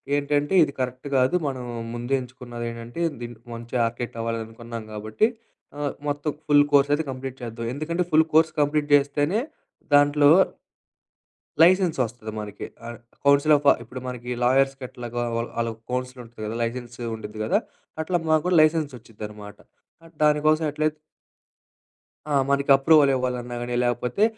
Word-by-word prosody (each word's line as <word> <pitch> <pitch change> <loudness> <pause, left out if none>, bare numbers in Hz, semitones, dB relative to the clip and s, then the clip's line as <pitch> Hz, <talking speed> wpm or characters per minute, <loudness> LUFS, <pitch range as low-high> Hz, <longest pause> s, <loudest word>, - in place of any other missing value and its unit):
ఏంటంటే 145 +2 0
ఇది 145 - -1
కరెక్ట్ 130 +2 -3
గాదు 130 +6 +3
మనం 130 -2 -4 0.3
ముందే 120 +3 -3
ఎంచుకున్నదేంటంటే 120 +1 -7 0.2
దిన్ 120 0 -6 0.2
మంచి 115 +1 -8
ఆర్కేట్ 120 +1 -4
అవ్వాలనుకున్నాం 115 0 -5
గాబట్టి 110 - 0 0.5
ఆహ్, 145 -1 -2
మొత్తం 145 +1 -1 0.2
ఫుల్ 145 -1 +6
కోర్స్ 140 0 +5
అయితే 160 - +1
కంప్లీట్ 130 0 -6
చేద్దాం. 115 -1 -5
ఎందుకంటే 170 +5 -1
ఫుల్ 155 +1 +5
కోర్స్ 160 0 +5
కంప్లీట్ 145 0 +1
జేస్తేనే 145 +7 +3 0.5
దాంట్లో 145 0 +5 1.3
లైసెన్స్ 180 -1 +5
వస్తది 110 -2 -7
మనకి. 105 -1 -7 0.2
ఆహ్, 120 -1 -7 0.3
కౌన్సిల్ 140 +2 +5
ఆఫ్ 145 - -5 0.2
ఇప్పుడు 125 +3 -8
మనకి 125 -1 -6
లాయర్స్‌కెట్లాగో 125 -2 0
వాళ్ల 115 +1 -2
ఆళ్ళకి 115 -1 -3
కౌన్సిల్ 125 0 -3
ఉంటుంది 115 -1 -12
కదా! 110 +2 -4
లైసెన్సు 120 +1 -4
ఉండిద్ది 110 -1 -8
కదా, - - +2 0.4
అట్లా 175 +3 0
మాకు 155 -1 +4
కూడా 180 -1 +3
లైసెన్స్ 155 -2 +2
వచ్చుద్దనమాట 105 -2 -10 0.5
ఆహ్, 165 - -16
దానికోసం 155 +1 +3
ఎట్లైతే 155 +1 -1 1.3
ఆ! 150 - -2 0.2
మనకి 140 0 +1
అప్రూవల్ 140 0 +5
ఇవ్వాలన్నా 125 -1 -3
గాని, 120 0 -3
లేపోతే 120 - +1
130 Hz, 140 wpm, -24 LUFS, 120-145 Hz, 1.3 s, ఫుల్